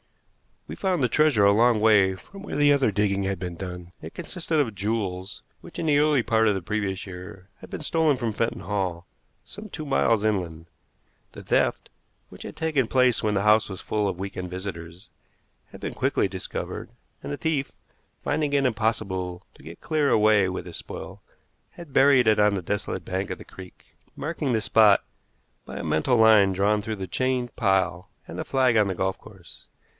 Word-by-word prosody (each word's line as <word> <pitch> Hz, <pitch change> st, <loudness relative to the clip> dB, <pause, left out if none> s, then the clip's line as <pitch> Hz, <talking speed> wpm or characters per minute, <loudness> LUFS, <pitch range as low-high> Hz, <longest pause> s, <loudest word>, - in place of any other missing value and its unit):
We -, -, -7 dB
found 185 Hz, -7 st, 0 dB
the 125 Hz, -, +2 dB
treasure 150 Hz, -10 st, +3 dB
a 100 Hz, -, +6 dB
long 115 Hz, +2 st, +4 dB
way 100 Hz, -4 st, +4 dB
from 195 Hz, -, -13 dB
where 200 Hz, -, -6 dB
the 145 Hz, 0 st, +4 dB
other 135 Hz, -6 st, +2 dB
digging 100 Hz, -1 st, 0 dB
had 95 Hz, 0 st, -2 dB
been 90 Hz, -1 st, -5 dB
done. 90 Hz, -1 st, -8 dB
It 80 Hz, -, -10 dB
consisted 165 Hz, -4 st, -2 dB
of 120 Hz, -7 st, 0 dB
jewels 95 Hz, -2 st, -3 dB, 0.2 s
which, -, -, -13 dB
in -, -, -3 dB
the 145 Hz, -2 st, +3 dB
early 150 Hz, -4 st, +3 dB
part 110 Hz, -1 st, +2 dB
of 105 Hz, -, +2 dB
the 95 Hz, -, -3 dB
previous 100 Hz, 0 st, -3 dB
year, 95 Hz, +1 st, -10 dB
had -, -, -13 dB
been -, -, -6 dB
stolen 155 Hz, -2 st, +1 dB
from 120 Hz, -3 st, -2 dB
Fenton 115 Hz, +2 st, -2 dB
Hall, 95 Hz, -4 st, -3 dB, 0.4 s
some 210 Hz, +1 st, -10 dB
two 155 Hz, -4 st, -6 dB
miles 115 Hz, -6 st, +2 dB
inland. 85 Hz, -6 st, -2 dB, 0.7 s
The -, -, -10 dB
theft, -, -, 0 dB, 0.4 s
which -, -, -11 dB
had -, -, -8 dB
taken 150 Hz, -6 st, 0 dB
place 125 Hz, -1 st, +3 dB
when 105 Hz, -1 st, 0 dB
the 100 Hz, -, +1 dB
house 105 Hz, 0 st, +4 dB
was 95 Hz, -, -7 dB
full 105 Hz, -1 st, -1 dB
of 95 Hz, -3 st, -3 dB
week 95 Hz, +1 st, -6 dB
end 90 Hz, -1 st, -4 dB
visitors, 90 Hz, -1 st, -8 dB, 0.6 s
had -, -, -12 dB
been -, -, -4 dB
quickly -, -, +1 dB
discovered, 95 Hz, -1 st, -6 dB, 0.3 s
and -, -, -6 dB
the 145 Hz, -, -3 dB
thief, 145 Hz, -4 st, -1 dB, 0.5 s
finding 150 Hz, -2 st, -1 dB
it 140 Hz, -1 st, +2 dB
impossible 105 Hz, -6 st, -1 dB
to -, -, -18 dB
get 85 Hz, +1 st, -11 dB
clear 155 Hz, -3 st, +1 dB
away 105 Hz, -2 st, +4 dB
with 90 Hz, -1 st, -4 dB
his 85 Hz, -2 st, -7 dB
spoil, -, -, -9 dB, 0.5 s
had 170 Hz, -6 st, -12 dB
buried 135 Hz, -2 st, +5 dB
it 110 Hz, -1 st, +4 dB
on 105 Hz, -1 st, +4 dB
the 95 Hz, -, -2 dB
desolate 100 Hz, +4 st, -3 dB
bank 95 Hz, +1 st, -3 dB
of -, -, -4 dB
the -, -, -11 dB
creek, 95 Hz, -1 st, -13 dB, 0.3 s
marking 150 Hz, -4 st, -2 dB
the 110 Hz, -, +1 dB
spot 105 Hz, -1 st, +5 dB, 0.6 s
by -, -, -8 dB
a -, -, -5 dB
mental 125 Hz, +11 st, +1 dB
line 110 Hz, -3 st, +6 dB
drawn 105 Hz, +3 st, +1 dB
through 110 Hz, +1 st, -4 dB
the 95 Hz, -2 st, -6 dB
chained 125 Hz, +4 st, -1 dB
pile 95 Hz, -4 st, 0 dB, 0.2 s
and -, -, -7 dB
the -, -, -3 dB
flag 130 Hz, -4 st, +2 dB
on 105 Hz, -2 st, +4 dB
the 95 Hz, -, -2 dB
golf 95 Hz, +2 st, -1 dB
course. -, -, -15 dB
105 Hz, 200 wpm, -25 LUFS, 95-130 Hz, 0.7 s, a